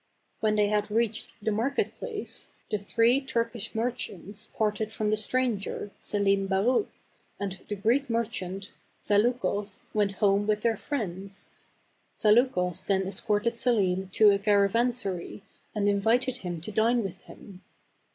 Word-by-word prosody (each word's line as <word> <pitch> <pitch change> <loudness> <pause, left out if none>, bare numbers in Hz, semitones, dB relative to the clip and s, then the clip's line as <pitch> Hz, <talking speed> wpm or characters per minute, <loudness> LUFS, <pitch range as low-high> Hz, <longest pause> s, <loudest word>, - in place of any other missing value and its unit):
When 215 -1 +2
they 210 -1 +4
had 210 0 0
reached 225 0 0 0.2
the 220 - +1
market 235 +7 0
place, 445 -4 -3 0.2
the 210 - 0
three 230 +6 +3
Turkish 230 -5 -3
merchants 225 -3 -3
parted 215 0 0
from 215 -1 -1
the - - +4
stranger, 215 -3 -1
Selim 200 -1 +1
Baruch, 205 - +2 0.5
and 190 -2 -4
the 205 - -2
Greek 240 +8 +1
merchant, 200 -5 -3 0.3
Zaleukos, 210 -2 +1
and - - -34
went 205 -2 +2
home 200 +1 +2
with 210 -1 +1
their 230 0 +2
friends. 195 -6 -5 0.7
Zaleukos 210 -5 +3
then 190 -1 +2
escorted 210 +3 0
Selim 190 -6 +1
to 215 -2 +7
a 200 - +2
caravansary 200 -1 +1 0.3
and 205 -1 +1
invited 230 +6 +2
him 175 -7 -5
to 195 - -5
dine 230 +3 +2
with 190 -1 -7
him. 190 -2 -13
210 Hz, 140 wpm, -28 LUFS, 200-230 Hz, 0.7 s, to